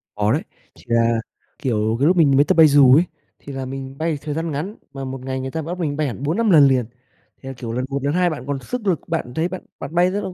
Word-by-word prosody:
Có 105 Hz, +1 st, +1 dB
đấy, 150 Hz, +6 st, +1 dB, 0.3 s
thì -, -, -18 dB
là, 115 Hz, -1 st, +2 dB, 0.4 s
kiểu, 110 Hz, -6 st, 0 dB
cái 145 Hz, -, +3 dB
lúc 180 Hz, +1 st, +3 dB
mình 140 Hz, -5 st, +5 dB
mới 140 Hz, -, +6 dB
tập -, -, +2 dB
bay 160 Hz, -1 st, +9 dB
dù 140 Hz, -3 st, +7 dB
ấy 160 Hz, -, +5 dB, 0.4 s
thì 140 Hz, -, -9 dB
là 135 Hz, -1 st, -4 dB
mình 135 Hz, +1 st, -7 dB
bay 160 Hz, -1 st, -1 dB
thời 150 Hz, -1 st, -4 dB
gian 165 Hz, +1 st, -3 dB
ngắn, 175 Hz, +10 st, -4 dB, 0.2 s
mà 135 Hz, -1 st, -5 dB
một 130 Hz, 0 st, -6 dB
ngày 130 Hz, 0 st, -3 dB
người 130 Hz, 0 st, -5 dB
ta 160 Hz, -, -3 dB
bắt 175 Hz, +4 st, -5 dB
mình 145 Hz, -4 st, -2 dB
bay 155 Hz, -2 st, 0 dB
hẳn 125 Hz, +2 st, -6 dB
4-5 200 Hz, +10 st, +1 dB
lần 145 Hz, -4 st, +7 dB
liền, 130 Hz, -3 st, +2 dB, 0.6 s
thì 135 Hz, -, -10 dB
là, -, -, -5 dB
kiểu, 120 Hz, -2 st, -6 dB
lần 125 Hz, +2 st, -2 dB
1 140 Hz, 0 st, -3 dB
lần 145 Hz, -, 0 dB
2 180 Hz, 0 st, +2 dB
bạn 140 Hz, -6 st, -6 dB
còn 140 Hz, -1 st, -2 dB
sức 225 Hz, -, -5 dB
lực, 180 Hz, -5 st, +2 dB
bạn 160 Hz, -7 st, -2 dB
thấy 160 Hz, +2 st, 0 dB
bạn 185 Hz, -, -6 dB, 0.2 s
bạn 170 Hz, -, -7 dB
bay 180 Hz, +1 st, +4 dB
rất 205 Hz, +2 st, -2 dB
ô 185 Hz, -, -5 dB
145 Hz, 290 wpm, -21 LUFS, 130-165 Hz, 0.6 s, bay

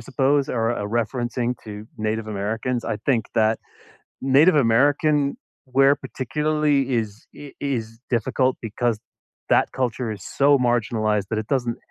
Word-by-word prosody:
suppose, 135 Hz, +3 st, +1 dB
or 115 Hz, -2 st, -1 dB
a 105 Hz, -4 st, -2 dB
referencing 120 Hz, +2 st, -2 dB
to 105 Hz, -1 st, -8 dB
Native 110 Hz, +1 st, -2 dB
Americans. 110 Hz, +4 st, -2 dB
I 105 Hz, -, -2 dB
think 120 Hz, -5 st, +3 dB
that 110 Hz, 0 st, +3 dB, 0.6 s
Native 140 Hz, +6 st, +5 dB
American 145 Hz, +4 st, +3 dB, 0.6 s
wear 135 Hz, +1 st, +7 dB
particularly 150 Hz, +2 st, 0 dB, 0.2 s
is 110 Hz, -2 st, -3 dB, 0.3 s
i -, -, -8 dB
is 135 Hz, -6 st, -1 dB, 0.3 s
difficult 130 Hz, +3 st, +1 dB
because 115 Hz, +1 st, -1 dB, 0.5 s
that -, -, +4 dB
culture 125 Hz, -2 st, -1 dB
is -, -, -14 dB, 0.2 s
so 140 Hz, +1 st, +5 dB, 0.2 s
marginalized 110 Hz, -3 st, 0 dB
that 110 Hz, -, -1 dB
it -, -, -25 dB
doesn't 120 Hz, -3 st, -1 dB
120 Hz, 135 wpm, -23 LUFS, 110-135 Hz, 0.6 s, wear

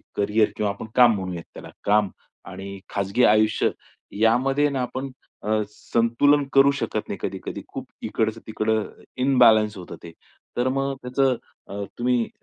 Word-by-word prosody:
Carrier 105 Hz, +1 st, +2 dB
किंवा 105 Hz, -1 st, 0 dB
आपण 100 Hz, -, -8 dB
काम 120 Hz, -3 st, +6 dB
म्हणूयात 90 Hz, -3 st, -5 dB
त्याला -, -, -10 dB
काम 105 Hz, -1 st, +3 dB, 0.4 s
आणि 100 Hz, 0 st, -8 dB
खाजगी 100 Hz, +5 st, 0 dB
आयुष्य 110 Hz, 0 st, +4 dB, 0.5 s
यामध्ये 135 Hz, +6 st, +3 dB
ना, 135 Hz, -2 st, -2 dB
आपण 130 Hz, +2 st, -4 dB, 0.3 s
अ, 110 Hz, 0 st, +1 dB
संतुलन 120 Hz, +7 st, +2 dB
करू 140 Hz, +1 st, +6 dB
शकत 140 Hz, -, -3 dB
नाही -, -, -3 dB
कधी-कधी. -, -, -5 dB
खूप -, -, -7 dB, 0.2 s
इकडचं 110 Hz, 0 st, -1 dB
तिकडं 110 Hz, 0 st, 0 dB, 0.4 s
इम्बॅलन्स 115 Hz, -5 st, +5 dB
होतं 90 Hz, -, -8 dB
ते. 85 Hz, -, -9 dB, 0.5 s
तर 125 Hz, +1 st, +1 dB
मग 135 Hz, +1 st, -1 dB
त्याचं 130 Hz, +1 st, +1 dB, 0.6 s
तुम्ही 120 Hz, -1 st, +1 dB
115 Hz, 140 wpm, -24 LUFS, 105-130 Hz, 0.6 s, काम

